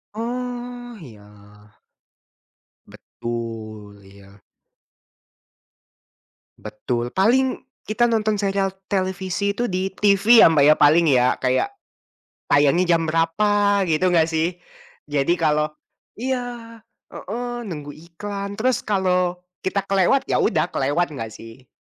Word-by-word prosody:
Oh 245 +1 -5
iya. 105 -7 -14 1.6
Betul 110 -3 -8
iya. 100 0 -17 2.2
Betul, 120 +3 -4
paling 255 +7 +2 0.2
kita 220 +3 +1
nonton 215 -2 0
serial 195 -1 0 0.2
televisi 190 +1 -1
itu 240 +4 -2
di 185 +1 -2
TV 210 +4 +5
ya - - +9
Mbak 150 -3 +3
ya - - -7
paling 160 +3 +5
ya 125 -2 +4
kayak, 130 - 0 0.8
tayangnya 170 +5 +4
jam 165 - +1
berapa 200 +5 +2
gitu 180 +4 +2
enggak 165 -2 +3
sih? 165 +2 -1 0.5
Jadi 145 +3 +1
kalau 150 -1 +1 0.5
iya, 245 -2 -4 0.3
heeh, 240 +4 -6
nunggu 150 -5 -7
iklan 200 +5 -7
terus 250 0 +1
kalau 180 -3 0 0.2
kita 195 +1 -1
kelewat 195 +8 +2
ya - - +2
udah 160 -4 +1
kelewat 145 +6 0
enggak 115 -6 -6
sih? 115 +3 -13
180 Hz, 110 wpm, -22 LUFS, 145-210 Hz, 2.2 s, ya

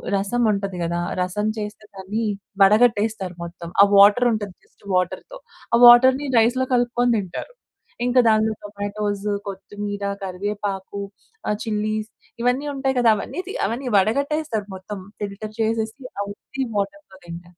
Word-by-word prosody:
రసం 200 +5 0
ఉంటది 195 -3 -3
గదా! 170 +1 -1 0.2
రసం 210 +4 -1
చేస్తే 210 0 -6
దాన్ని 195 +4 -3 0.4
వడగట్టేస్తారు 210 -3 +3
మొత్తం. 170 0 -8
ఆ - - +8
వాటర్ 205 +5 +7
ఉంటది 205 -4 -4
జస్ట్ - - -27
వాటర్‌తో 185 - -2 0.4
ఆ - - +4
వాటర్‌ని 260 +4 +7
రైస్‌లో 250 +3 +2
కలుపుకొని 245 0 +2
తింటారు. 200 - -5 0.5
ఇంకా 250 +1 +4
దానిలో 220 0 +3
టొమాటోస్, 205 0 -4 0.2
కొత్తిమీర, 205 +1 -6 0.2
కరివేపాకు, 200 +1 -4 0.5
ఆహ్, 210 - 0
చిల్లీస్ 215 0 -2 0.3
ఇవన్నీ 255 +4 +1
ఉంటాయి 270 -1 -1
కదా! 235 -2 +5
అవన్నీ 355 - -5
తీ 410 - -5
అవన్నీ 250 +3 -3
వడగట్టేస్తారు 245 +1 0
మొత్తం 195 +2 -8 0.2
ఫిల్టర్ 210 +1 -6
చేసేసి 225 +3 -1 0.2
ఆహ్, 200 - -3
ఉత్తి 265 +6 -6
వాటర్‌తో 295 0 -4
తింటారు. 175 +1 -10
210 Hz, 135 wpm, -22 LUFS, 200-240 Hz, 0.5 s, ఆ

